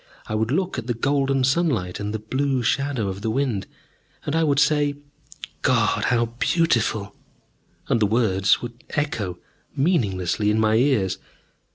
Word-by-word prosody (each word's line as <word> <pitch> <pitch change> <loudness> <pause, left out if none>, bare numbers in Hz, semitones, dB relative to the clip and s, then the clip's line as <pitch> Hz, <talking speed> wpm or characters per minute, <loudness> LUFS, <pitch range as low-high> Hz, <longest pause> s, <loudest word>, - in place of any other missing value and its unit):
I - - -5
would 110 +1 0
look 185 +7 -1
at 115 - -8
the 120 - -1
golden 135 +2 +1
sunlight 130 - 0
and 105 0 -3
the 110 - -2
blue 130 +4 -1
shadow 135 -2 0
of 95 +1 -5
the 110 - -1
wind, 115 -5 -1 0.6
and 145 - -1
I 165 - +3
would 145 -3 +2
say, 145 -1 +3 0.7
"God! - - +2
How 120 -1 +2
beautiful!" 110 - +1 0.7
And - - +2
the 105 - +3
words 100 -3 +2
would 120 +1 -8
echo 110 -12 -2 0.4
meaninglessly 105 - +1
in 105 +1 +2
my 110 0 +3
ears. 110 -6 +2
120 Hz, 155 wpm, -23 LUFS, 105-140 Hz, 0.7 s, I